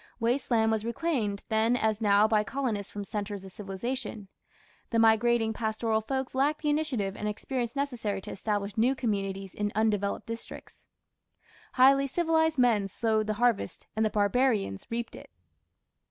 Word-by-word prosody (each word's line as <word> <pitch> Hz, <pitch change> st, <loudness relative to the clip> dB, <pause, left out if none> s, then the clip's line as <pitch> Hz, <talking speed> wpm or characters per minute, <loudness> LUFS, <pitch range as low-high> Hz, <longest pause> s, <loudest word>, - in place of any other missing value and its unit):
Waste 240 Hz, +4 st, 0 dB
land 225 Hz, -2 st, +3 dB
was 220 Hz, -1 st, 0 dB
reclaimed 235 Hz, -5 st, -1 dB
then 225 Hz, +2 st, +2 dB
as 220 Hz, -1 st, 0 dB
now 205 Hz, 0 st, +5 dB
by 215 Hz, -1 st, +2 dB
colonists 225 Hz, -6 st, -3 dB
from 205 Hz, -, -5 dB
centres 205 Hz, -1 st, -5 dB
of 190 Hz, -, -9 dB
civilization; 210 Hz, +2 st, -5 dB, 0.6 s
the 230 Hz, -, 0 dB
migrating 225 Hz, 0 st, +4 dB
pastoral 220 Hz, 0 st, -1 dB
folks 265 Hz, +3 st, -3 dB
lacked 290 Hz, +4 st, +1 dB
the 300 Hz, -, +2 dB
initiative 255 Hz, -11 st, -1 dB
and 210 Hz, -, -4 dB
experience 235 Hz, +3 st, -3 dB
necessary 245 Hz, -8 st, -2 dB
to -, -, -8 dB
establish 205 Hz, -1 st, -2 dB
new 245 Hz, +5 st, +3 dB
communities 195 Hz, -6 st, -2 dB
in 210 Hz, 0 st, -2 dB
undeveloped 210 Hz, -2 st, 0 dB
districts. 230 Hz, 0 st, -9 dB, 0.9 s
Highly 275 Hz, +2 st, +5 dB
civilized 320 Hz, +1 st, +1 dB
men 230 Hz, -6 st, +3 dB
sowed 220 Hz, +1 st, 0 dB
the 215 Hz, -, -1 dB
harvest 240 Hz, -2 st, 0 dB
and 220 Hz, -, +1 dB
the 215 Hz, -, +2 dB
barbarians 210 Hz, -, +1 dB
reaped 235 Hz, 0 st, -4 dB
it. -, -, -12 dB
220 Hz, 155 wpm, -28 LUFS, 205-250 Hz, 0.9 s, now